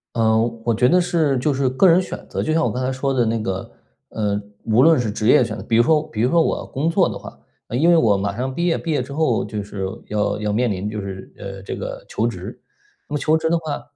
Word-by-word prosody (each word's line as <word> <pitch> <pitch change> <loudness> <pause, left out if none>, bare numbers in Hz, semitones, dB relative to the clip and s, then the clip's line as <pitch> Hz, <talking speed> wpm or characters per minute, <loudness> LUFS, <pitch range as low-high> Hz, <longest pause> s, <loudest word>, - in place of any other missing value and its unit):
呃， 110 -1 +3 0.3
我 115 - +1
觉 125 +3 +3
得 180 +5 +4
是 160 -6 +1
就 140 +3 0
是 135 0 +1
个 130 +9 +4
人 175 +2 +5
选 - - -8
择， - - -3
就 155 - 0
像 165 +1 +2
我 - - +1
刚 125 - -3
才 130 - 0
说 135 +1 -1
的 125 -2 +2
那 115 0 0
个， 95 -3 -4 0.4
呃， 105 -2 -1 0.2
无 115 +2 +3
论 160 +2 +6
是 120 -4 -1
职 105 +2 -1
业 125 - +6
选 110 -1 -5
择 - - -7
比 115 - 0
如 115 - +6
说 155 0 +3
比 110 - -4
如 125 +3 +2
说 170 -1 +4
我 - - -1
工 155 +5 -1
作 180 +2 +3
的 - - -5
话 - - -10 0.3
因 135 +8 +2
为 175 - +6
我 110 -10 +4
马 100 0 -2
上 130 +2 -2
毕 170 +6 -1
业， 165 - +2
毕 165 - -4
业 150 - +1
之 130 +3 -9
后 145 -6 +1
就 105 0 -4
是 100 -1 -5 0.2
要 105 -1 0
要 105 -1 -1
面 120 +4 +1
临 100 +1 -3
就 105 - -4
是， 95 -1 -8
呃， 95 -1 -8
这 - - -5
个 - - -6
求 - - -1
职。 - - -6 0.5
那 145 - -5
么 - - +1
求 155 +3 +2
职 160 - -1
的 170 - +2
话， 155 -3 -5
125 Hz, 295 characters per minute, -21 LUFS, 105-160 Hz, 0.5 s, 论